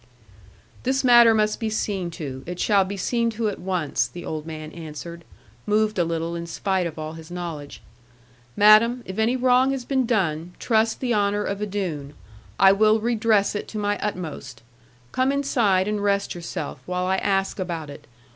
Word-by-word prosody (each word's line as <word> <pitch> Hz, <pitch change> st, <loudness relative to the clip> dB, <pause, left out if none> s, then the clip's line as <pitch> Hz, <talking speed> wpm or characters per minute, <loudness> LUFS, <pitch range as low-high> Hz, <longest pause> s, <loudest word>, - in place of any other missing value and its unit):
'This 265 Hz, +2 st, 0 dB
matter 240 Hz, -2 st, +7 dB
must 215 Hz, -1 st, +1 dB
be 225 Hz, -2 st, -1 dB
seen 200 Hz, -4 st, -2 dB
to; 145 Hz, -6 st, -6 dB
it 180 Hz, 0 st, -6 dB
shall 200 Hz, -3 st, +3 dB
be 200 Hz, +2 st, -5 dB
seen 235 Hz, +4 st, 0 dB
to 220 Hz, -1 st, -1 dB
at 205 Hz, -, -6 dB
once,' 175 Hz, -9 st, -1 dB
the 175 Hz, +8 st, -9 dB
old 155 Hz, 0 st, -5 dB
man 155 Hz, -1 st, -7 dB
answered, 170 Hz, +1 st, -8 dB, 0.4 s
moved 215 Hz, -1 st, +1 dB
a -, -, +4 dB
little 165 Hz, 0 st, -2 dB
in 170 Hz, 0 st, -5 dB
spite 185 Hz, +1 st, -1 dB
of 160 Hz, -, -9 dB
all 155 Hz, 0 st, -5 dB
his 160 Hz, 0 st, -11 dB
knowledge. 170 Hz, -5 st, -7 dB, 0.7 s
'Madam, 225 Hz, +4 st, +6 dB
if 190 Hz, +3 st, -6 dB
any 225 Hz, +3 st, +2 dB
wrong 255 Hz, +1 st, +3 dB
has 270 Hz, -2 st, -3 dB
been 265 Hz, -2 st, 0 dB
done, 175 Hz, -6 st, -1 dB
trust 225 Hz, -1 st, +1 dB
the 250 Hz, -2 st, 0 dB
honour 205 Hz, -1 st, +1 dB
of 200 Hz, 0 st, -3 dB
a 210 Hz, -, -1 dB
Doone; 160 Hz, -8 st, -4 dB, 0.4 s
I 195 Hz, 0 st, +8 dB
will 215 Hz, +2 st, +4 dB
redress 220 Hz, -2 st, +2 dB
it 205 Hz, -, -4 dB
to 215 Hz, -, -7 dB
my 205 Hz, 0 st, -1 dB
utmost. 150 Hz, -, -5 dB, 0.5 s
Come 260 Hz, +1 st, +1 dB
inside 235 Hz, -9 st, +1 dB
and 210 Hz, -1 st, -1 dB
rest 200 Hz, -1 st, +1 dB
yourself, 170 Hz, -1 st, -6 dB
while 180 Hz, 0 st, -1 dB
I 190 Hz, +1 st, +1 dB
ask 195 Hz, 0 st, 0 dB
about 165 Hz, -5 st, -4 dB
it. 145 Hz, +1 st, -12 dB
195 Hz, 185 wpm, -24 LUFS, 170-220 Hz, 0.7 s, I